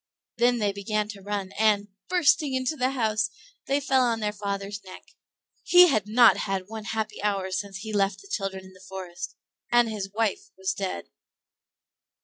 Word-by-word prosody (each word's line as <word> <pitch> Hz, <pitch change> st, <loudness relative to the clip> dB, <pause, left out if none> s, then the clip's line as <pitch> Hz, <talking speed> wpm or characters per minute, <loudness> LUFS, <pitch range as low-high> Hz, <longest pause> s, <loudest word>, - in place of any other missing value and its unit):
Then 240 Hz, +1 st, +3 dB
they 210 Hz, -3 st, +1 dB
began 210 Hz, +1 st, -2 dB
to 205 Hz, -3 st, -8 dB
run, 200 Hz, -1 st, -3 dB
and, 210 Hz, -2 st, +3 dB, 0.2 s
bursting 310 Hz, -5 st, +3 dB
into 260 Hz, +4 st, 0 dB
the 255 Hz, -3 st, +1 dB
house, 220 Hz, -5 st, 0 dB, 0.4 s
they 275 Hz, +1 st, +2 dB
fell 270 Hz, -2 st, +2 dB
on 235 Hz, -2 st, +1 dB
their 210 Hz, -1 st, -1 dB
father's 200 Hz, 0 st, -4 dB
neck. 185 Hz, -1 st, -11 dB, 0.6 s
He 360 Hz, 0 st, +7 dB
had 215 Hz, -7 st, +1 dB
not 235 Hz, +2 st, +6 dB
had 195 Hz, -2 st, -2 dB
one 220 Hz, +1 st, -8 dB
happy 220 Hz, -2 st, -3 dB
hour 195 Hz, -2 st, -1 dB
since 195 Hz, +1 st, -3 dB
he 220 Hz, +2 st, -7 dB
had 210 Hz, -, -1 dB
left 195 Hz, 0 st, +1 dB
the -, -, -14 dB
children 195 Hz, -, -3 dB
in 190 Hz, -, -14 dB
the 185 Hz, -, -17 dB
forest; 180 Hz, -2 st, -7 dB, 0.4 s
and 240 Hz, -1 st, +5 dB
his 205 Hz, -3 st, -4 dB
wife 230 Hz, -, -1 dB
was 380 Hz, -1 st, -1 dB
dead. -, -, -4 dB
215 Hz, 180 wpm, -26 LUFS, 195-240 Hz, 0.6 s, He